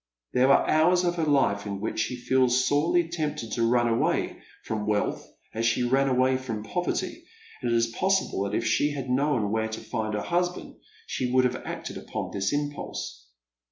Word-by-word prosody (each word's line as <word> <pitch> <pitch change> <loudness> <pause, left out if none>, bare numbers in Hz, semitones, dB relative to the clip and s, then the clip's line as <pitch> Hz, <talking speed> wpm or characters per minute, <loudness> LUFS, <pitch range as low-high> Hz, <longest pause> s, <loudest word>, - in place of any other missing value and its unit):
There 130 +2 +4
are - - +4
hours 175 +4 +4
of 175 -1 +1
her 165 - +1
life 135 -9 +2
in 100 -1 -4
which 105 - -3
she 110 +3 -1
feels 130 0 +2
sorely 165 +4 +2
tempted 150 -9 -3
to 115 0 +1
run 120 0 +3
away 115 0 0 0.2
from 105 -2 -3
wealth 105 -1 -1 0.2
as 115 - -2
she 115 +2 +1
ran 135 +3 +2
away 130 0 +3
from 115 -5 -5
poverty; 180 - -2 0.4
and 120 -2 -1
it - - +3
is 115 - +3
possible 190 - 0
that 100 +1 -2
if 115 - -2
she 145 - +2
had 135 -3 -5
known 130 -6 +1
where 110 0 0
to 110 - -5
find 110 -1 -3
her 105 - -2
husband 180 +1 -2 0.3
she 125 - -2
would 130 0 +4
have 125 0 0
acted - - -5
upon - - -5
this 100 0 -1
impulse. 145 - -4
125 Hz, 195 wpm, -27 LUFS, 110-145 Hz, 0.4 s, There